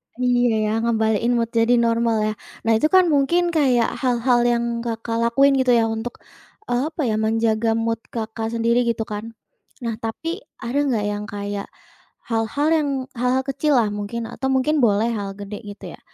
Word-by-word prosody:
Iya 245 0 +1 0.2
iya, 215 - 0
ngembaliin 225 0 +1
mood 230 -1 0
jadi 230 +1 +3
normal 230 -1 +2
ya. - - -4 0.3
Nah 230 - +3
itu 305 - +3
kan 370 -1 +7
mungkin 295 +5 +3
kayak 260 -8 +2
hal-hal 245 -1 +2
yang 235 -1 +2 0.2
Kakak 230 0 -3
lakuin 275 +4 +4
gitu 255 -2 +4
ya 230 - +4
untuk, 225 +2 -5 0.5
e - - -3 0.2
apa 315 0 -5
ya, 215 - +1
menjaga 225 0 +1
mood 230 0 -1 0.2
Kakak 225 0 -3
sendiri 235 +1 +2
gitu 230 -1 0
kan. 215 +2 -7 0.5
Nah 230 -2 -2
tapi, 330 - -4 0.2
ada 245 +5 -1
enggak 230 -7 0
yang 205 0 -3
kayak 205 0 -4 0.6
hal-hal 225 +6 0
yang 305 -3 +1 0.3
hal-hal 250 +2 +1
kecil 280 +2 0
lah 220 - +2
mungkin 210 +3 -4
atau 265 +2 -4
mungkin 265 +4 +2
boleh 220 0 +3
hal 205 -3 -3
gede 205 +1 -6
gitu 205 0 -9
ya. - - -28
230 Hz, 175 wpm, -22 LUFS, 220-255 Hz, 0.6 s, kan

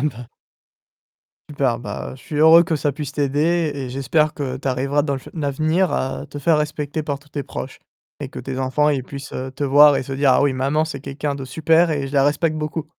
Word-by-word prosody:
Ah - - -3
bah 120 -2 -11 1.2
Super, 130 -5 0
bah, - - -6
je - - -18
suis 150 - -6
heureux 160 +2 +7
que 165 -1 -1
ça 145 0 -1
puisse 145 0 -5
t'aider 150 +3 0
et 135 -2 -5
j'espère 150 +4 +1
que 130 -3 -3
tu 135 - -4
arriveras 135 +3 0
dans 140 -2 -1
le - - -3
fu - - -13
l'avenir 155 +4 0
à 130 +1 -2
te 145 - -6
faire 155 +3 +3
respecter 150 0 -3
par 145 -2 -3
tous 145 +1 -23
tes 145 -1 -4
proches - - -7 0.4
et - - -4
que - - -9
tes 135 -1 -5
enfants 130 +3 +1
ils 140 -3 0
puissent 140 +1 -9 0.2
te 145 - -2
voir 145 +1 +6
et - - -2
se 135 - -6
dire: 135 0 +2
«Ah - - +3
oui 145 -1 +2
maman 140 +4 0
c'est 155 -4 -6
quelqu'un 140 +1 -4
de 135 -1 -6
super 160 +5 +2
et 145 -3 -1
je 135 - -9
la 140 -1 +4
respecte 150 +3 +1
beaucoup». 155 0 -3
145 Hz, 235 wpm, -21 LUFS, 135-155 Hz, 1.2 s, heureux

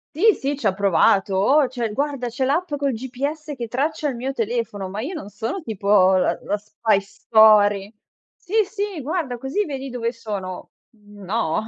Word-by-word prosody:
Sì, 430 +6 +5
sì, 280 -3 -3
ci 240 - -7
ha 195 - +3
provato: 195 0 +3
"Oh, 265 +8 +4
c'è 240 -4 -3
guarda, 275 -3 -2
c'è 260 +3 -3
l'app 300 +4 0
col 280 -2 0
GPS 280 +6 -4
che 235 -3 -5
traccia 295 +5 -1
il 255 - -4
mio 260 +3 -3
telefono". 225 -5 -2
Ma 205 +3 -4
io 315 +9 -4
non 205 - -7
sono 225 - -4
tipo 200 - +3
la 185 - +2
la 205 - 0
spy 210 0 0
story. 205 0 +4 0.4
"Sì, 380 - -13
sì, 400 -5 -4
guarda, 285 -4 -2
così 270 - -2
vedi 270 -3 -5
dove 235 -2 -2
sono". 200 -6 -6 0.2
Mhmm, 205 -2 -16
no. 190 -4 0
235 Hz, 180 wpm, -22 LUFS, 205-285 Hz, 0.4 s, Sì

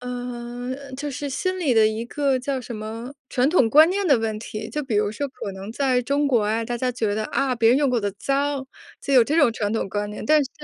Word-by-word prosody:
呃， 245 +2 -6
就 290 +1 -4
是 285 +2 -4
心 370 +6 -2
理 285 -7 +2
的 220 -1 +6
一 220 +2 -2
个 275 +1 0
叫 260 +1 -2
什 240 -1 -7
么 225 +5 -7
传 260 +1 +2
统 280 -9 +4
观 310 +3 +7
念 390 +1 -1
的 275 -7 +5
问 220 -1 -2
题， 215 0 -6
就 300 +6 -3
比 235 -6 -2
如 210 0 +2
说 285 +6 -3
可 200 -6 -7
能 195 +3 -8
在 260 -1 +1
中 285 +3 +1
国 230 -6 +2
呀， 225 +1 0
大 240 +1 -3
家 250 +1 0
觉 225 -4 -1
得， 215 0 -2
啊， 275 -2 0
别 225 -1 +3
人 255 +4 +5
用 285 - +2
过 245 -2 +1
的 205 -1 -1
脏， 275 -1 -1 0.3
就 280 - -3
有 250 - +8
这 300 +7 0
种 285 -8 +5
传 210 -2 -2
统 225 - -1
观 205 +1 -2
念， 210 - -7
但 305 +3 +4
是 265 - -6
250 Hz, 275 characters per minute, -23 LUFS, 225-280 Hz, 0.3 s, 有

